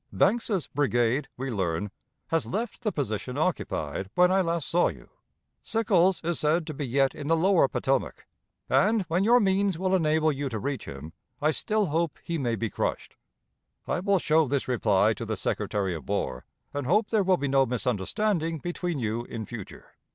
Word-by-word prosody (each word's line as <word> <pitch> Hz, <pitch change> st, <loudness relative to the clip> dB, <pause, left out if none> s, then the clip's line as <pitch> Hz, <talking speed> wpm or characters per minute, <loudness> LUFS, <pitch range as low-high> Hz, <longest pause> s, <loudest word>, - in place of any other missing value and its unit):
"Banks's 205 Hz, -, +1 dB
brigade, 130 Hz, -1 st, +1 dB
we 135 Hz, +1 st, -3 dB
learn, 95 Hz, -1 st, -2 dB, 0.4 s
has 165 Hz, 0 st, 0 dB
left 230 Hz, +6 st, -3 dB
the 215 Hz, -3 st, 0 dB
position 125 Hz, -, -3 dB
occupied 95 Hz, -, -2 dB
when 180 Hz, 0 st, +5 dB
I 190 Hz, 0 st, +4 dB
last 170 Hz, -3 st, -1 dB
saw 175 Hz, +1 st, +3 dB
you. -, -, -8 dB, 0.5 s
Sickles 190 Hz, -6 st, +2 dB
is 170 Hz, -1 st, -1 dB
said 155 Hz, +2 st, +1 dB
to 155 Hz, -, -5 dB
be 140 Hz, -1 st, -4 dB
yet 135 Hz, +2 st, +2 dB
in 145 Hz, -1 st, -7 dB
the 165 Hz, +1 st, +3 dB
lower 185 Hz, -3 st, +4 dB
Potomac, -, -, -1 dB, 0.4 s
and, 215 Hz, +1 st, +3 dB
when 175 Hz, +2 st, 0 dB
your 240 Hz, +4 st, +6 dB
means 195 Hz, -3 st, +2 dB
will 185 Hz, +1 st, 0 dB
enable 155 Hz, -3 st, +3 dB
you 140 Hz, -1 st, -3 dB
to 115 Hz, -, -3 dB
reach 135 Hz, +4 st, -3 dB
him, 75 Hz, +4 st, -8 dB, 0.3 s
I 155 Hz, +1 st, +2 dB
still 215 Hz, +6 st, 0 dB
hope 165 Hz, -1 st, -1 dB
he 170 Hz, -1 st, -3 dB
may 120 Hz, -4 st, 0 dB
be 110 Hz, -1 st, -3 dB
crushed. -, -, -3 dB, 0.7 s
"I -, -, 0 dB
will 200 Hz, +1 st, +2 dB
show 160 Hz, -3 st, +3 dB
this 140 Hz, +1 st, -1 dB
reply 105 Hz, -4 st, +3 dB
to 95 Hz, -, -7 dB
the -, -, -3 dB
Secretary 100 Hz, -3 st, -1 dB
of 80 Hz, -6 st, -8 dB
War, 65 Hz, -1 st, -2 dB, 0.3 s
and 145 Hz, -3 st, -3 dB
hope 210 Hz, +7 st, +2 dB
there 220 Hz, -2 st, +3 dB
will 185 Hz, -1 st, +3 dB
be 140 Hz, -, -2 dB
no 135 Hz, 0 st, +3 dB
misunderstanding 160 Hz, -, -1 dB
between 175 Hz, +1 st, -3 dB
you 115 Hz, -1 st, -2 dB
in 115 Hz, -2 st, -6 dB
future. 110 Hz, -3 st, -9 dB
155 Hz, 185 wpm, -27 LUFS, 120-185 Hz, 0.7 s, your